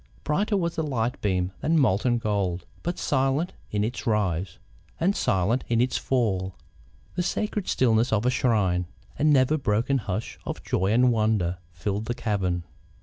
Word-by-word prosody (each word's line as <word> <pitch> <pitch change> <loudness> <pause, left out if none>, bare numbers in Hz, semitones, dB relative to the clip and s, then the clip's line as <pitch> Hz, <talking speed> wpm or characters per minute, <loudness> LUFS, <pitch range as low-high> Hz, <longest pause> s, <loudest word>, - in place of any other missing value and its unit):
Brighter 200 +7 +1
was 170 -3 -1
the - - +1
light 125 -4 -1
beam 95 -2 0
than 165 +1 +2
molten 120 -1 +3
gold, 100 -6 -1 0.2
but 175 +1 -3
silent 135 +4 0 0.2
in 105 -1 0
its 115 +1 -3
rise, 95 -5 0 0.4
and 190 +5 +2
silent 100 +7 +1
in 115 -1 +2
its 125 +1 +1
fall. 95 -8 0 0.6
The 180 - -1
sacred 210 +2 -2
stillness 115 -1 +2
of 110 +1 +1
a 125 - +4
shrine, 95 -8 +1 0.3
a - - 0
never 150 0 +4
broken 125 +3 +1
hush 105 0 -4
of - - -5
joy 95 +2 0
and 125 +2 +4
wonder, 110 -6 +1
filled 100 +5 -3
the 120 - -2
cavern. 95 -7 -1
115 Hz, 160 wpm, -26 LUFS, 95-135 Hz, 0.6 s, a